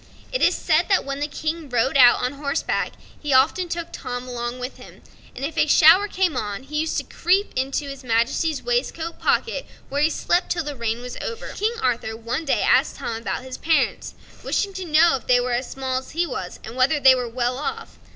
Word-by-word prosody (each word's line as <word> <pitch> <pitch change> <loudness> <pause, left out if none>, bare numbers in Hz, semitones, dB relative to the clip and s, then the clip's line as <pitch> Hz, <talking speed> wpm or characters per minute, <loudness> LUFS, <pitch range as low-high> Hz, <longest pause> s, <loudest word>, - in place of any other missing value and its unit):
It - - 0
is - - +4
said - - +1
that 390 - +3
when 275 0 -4
the 295 - -1
King 310 +1 -4
rode 250 +2 +1
out 245 -3 +6
on 250 +2 -1
horseback 280 +2 -2 0.3
he 295 -2 -1
often 320 +7 +3
took 335 0 -4
Tom 245 0 -5
along 240 0 -4
with 250 +1 -6
him, - - -14 0.3
and 270 - -4
if 315 - -3
a - - +3
shower 330 +7 +6
came 370 -6 0
on 210 0 -3
he 300 +3 -3
used 315 +1 -1
to - - -1
creep 385 +4 0
into 270 +2 -1
his 275 -1 -8
Majesty's 250 +6 0
waistcoat 340 -9 -2
pocket, - - 0 0.2
where 285 +1 -1
he 305 - +4
slept 350 +2 0
till 340 -1 0
the 295 -1 -5
rain 235 -1 -3
was 250 0 -7
over. 460 - -5
King 440 +3 -1
Arthur 235 -3 -1
one 240 +7 -3
day 275 - +1
asked - - +3
Tom 230 - -4
about 225 +1 -4
his 260 0 -8
parents, 320 0 0 0.3
wishing 400 -1 -1
to 375 -1 -5
know 320 -1 +4
if - - -15
they 250 -1 +5
were 245 0 -1
as 245 +2 -2
small 260 -1 -2
as 260 - -13
he 345 - +3
was, 250 - -6
and 225 - -8
whether 260 +4 +3
they 265 -1 +8
were 250 -2 -2
well 245 +2 -1
off. 455 +9 -5
275 Hz, 220 wpm, -23 LUFS, 250-330 Hz, 0.3 s, they